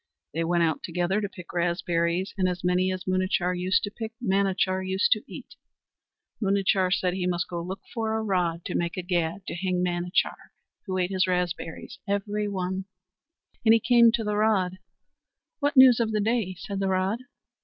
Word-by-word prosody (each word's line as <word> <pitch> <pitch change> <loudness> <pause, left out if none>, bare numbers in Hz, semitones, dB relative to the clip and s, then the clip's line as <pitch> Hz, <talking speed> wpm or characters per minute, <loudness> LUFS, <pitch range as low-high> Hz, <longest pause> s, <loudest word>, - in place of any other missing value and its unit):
They 165 +2 -1
went 170 +1 +2
out 160 -2 0
together 180 +4 -1
to 205 - -3
pick 180 -3 -11
raspberries, 175 +1 0
and 185 -2 +1
as 180 -1 -4
many 180 +1 +2
as 185 0 -4
Munachar 185 -1 0
used 185 +2 +1
to 205 - -3
pick 225 +1 -6
Manachar 195 -3 +1
used 190 +1 +1
to 215 - +4
eat. - - -10 0.9
Munachar 195 -2 +2
said 180 -1 +1
he 180 -1 -1
must 175 -1 -1
go 175 -1 -4
look 185 +3 -6
for 220 -2 -1
a 220 - -2
rod 175 -5 0
to 180 - -4
make 170 +1 -1
a 185 - -2
gad 175 +1 -1
to - - -5
hang 180 0 -1
Manachar, 175 +1 -1 0.3
who 185 -1 -2
ate 180 0 0
his 185 -1 +2
raspberries 180 -2 -3
every 205 +1 -1
one; 190 -1 -3 0.8
and 225 -1 +6
he - - +3
came 235 0 +5
to 235 -1 0
the 210 -1 -1
rod. 190 -4 +1 0.8
"What 285 -1 0
news 260 -2 +9
the 220 -1 -1
day?" 215 -3 0
said 195 +2 -5
the 195 - 0
rod. 190 +4 0
185 Hz, 185 wpm, -26 LUFS, 180-205 Hz, 0.9 s, news